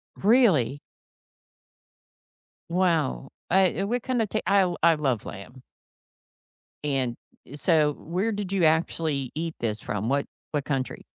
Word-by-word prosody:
Really? 190 Hz, -, +3 dB, 1.9 s
Wow. 165 Hz, -7 st, 0 dB, 0.2 s
Uh, -, -, -2 dB, 0.3 s
i -, -, +1 dB
what 240 Hz, +3 st, -1 dB
kind 255 Hz, -3 st, 0 dB
of 210 Hz, -, -1 dB
ta 215 Hz, -, 0 dB
I 190 Hz, -3 st, +3 dB
I 170 Hz, -1 st, +7 dB
love 135 Hz, -7 st, -1 dB
lamb. 120 Hz, +6 st, -9 dB, 1.2 s
And 135 Hz, -4 st, -1 dB, 0.4 s
so 150 Hz, -2 st, +2 dB
where 185 Hz, +10 st, -2 dB
did 205 Hz, -2 st, -4 dB
you 190 Hz, -4 st, +2 dB
actually 155 Hz, -4 st, +1 dB
eat 165 Hz, 0 st, -3 dB
this 110 Hz, -2 st, -2 dB
from? 105 Hz, +3 st, -3 dB
What 140 Hz, +1 st, +1 dB, 0.3 s
what 145 Hz, -2 st, -2 dB
country? 135 Hz, -4 st, -3 dB
155 Hz, 130 wpm, -26 LUFS, 135-190 Hz, 1.9 s, I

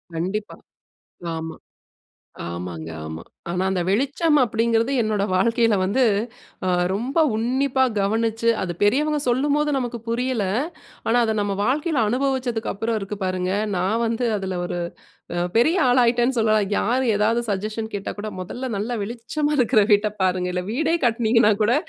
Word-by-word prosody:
கண்டிப்பா. 190 Hz, +6 st, -3 dB, 0.8 s
ஆமா. 160 Hz, 0 st, -5 dB, 0.9 s
ஆமாங்க. 85 Hz, -2 st, -6 dB, 0.2 s
ஆமா. 80 Hz, +1 st, -6 dB, 0.3 s
ஆனா, 180 Hz, +2 st, -1 dB
அந்த 185 Hz, -2 st, 0 dB
வெளிச்சம் 280 Hz, -, +2 dB
அப்டீங்கிறது 230 Hz, +1 st, +1 dB
என்னோட 215 Hz, -2 st, 0 dB
வாழ்க்கையில 230 Hz, +3 st, +3 dB
வந்து 200 Hz, +8 st, +1 dB, 0.6 s
அ -, -, +1 dB, 0.2 s
ரொம்ப 245 Hz, -, -2 dB, 0.2 s
உன்னிப்பா 260 Hz, +3 st, +1 dB, 0.2 s
கவனிச்சு, 225 Hz, +3 st, 0 dB
அது 180 Hz, -2 st, -2 dB
பெரியவங்க 295 Hz, +9 st, +2 dB
சொல்லும்போது 290 Hz, +4 st, +2 dB
நமக்கு 245 Hz, -2 st, -3 dB
புரியல. 240 Hz, -1 st, 0 dB, 0.6 s
ஆனா, 230 Hz, -, +2 dB
அத 220 Hz, -1 st, 0 dB
நம்ம 205 Hz, -1 st, -1 dB
வாழ்க்கையில 290 Hz, +2 st, +1 dB
அனுபவிச்சதுக்கு 250 Hz, -2 st, -1 dB
அப்புறம் 225 Hz, +2 st, -1 dB
இருக்கு 195 Hz, +1 st, -5 dB
பாருங்க. 185 Hz, 0 st, -1 dB, 0.2 s
நான் 195 Hz, +6 st, 0 dB
வந்து 230 Hz, +2 st, 0 dB
அதுல 190 Hz, -2 st, -3 dB
ஒரு 175 Hz, -, -3 dB, 0.8 s
பெரிய 310 Hz, +9 st, +4 dB
அ -, -, +4 dB
ஆளாயிட்டேன்னு 245 Hz, 0 st, +3 dB
சொல்லலாம். 215 Hz, -2 st, +2 dB
யார் 255 Hz, +4 st, +1 dB
ஏதாவது 225 Hz, +3 st, +2 dB
சஜஷன் 215 Hz, +3 st, -3 dB
கேட்டா 200 Hz, -, -4 dB
கூட, 215 Hz, +1 st, -4 dB
"முதல்ல 250 Hz, +8 st, -5 dB
நல்ல 225 Hz, +3 st, -2 dB
வெளிச்சமா 245 Hz, +7 st, -2 dB
இருக்கிற 220 Hz, -3 st, +4 dB
வீட்ட 210 Hz, +1 st, +2 dB
பாருங்க 180 Hz, -1 st, +1 dB
இல்ல 180 Hz, 0 st, -1 dB
வீடே 315 Hz, +6 st, +1 dB
கட்டுனிங்கன்னா 230 Hz, -1 st, +3 dB
கூட 230 Hz, +4 st, +3 dB
225 Hz, 140 wpm, -23 LUFS, 200-250 Hz, 0.9 s, பெரிய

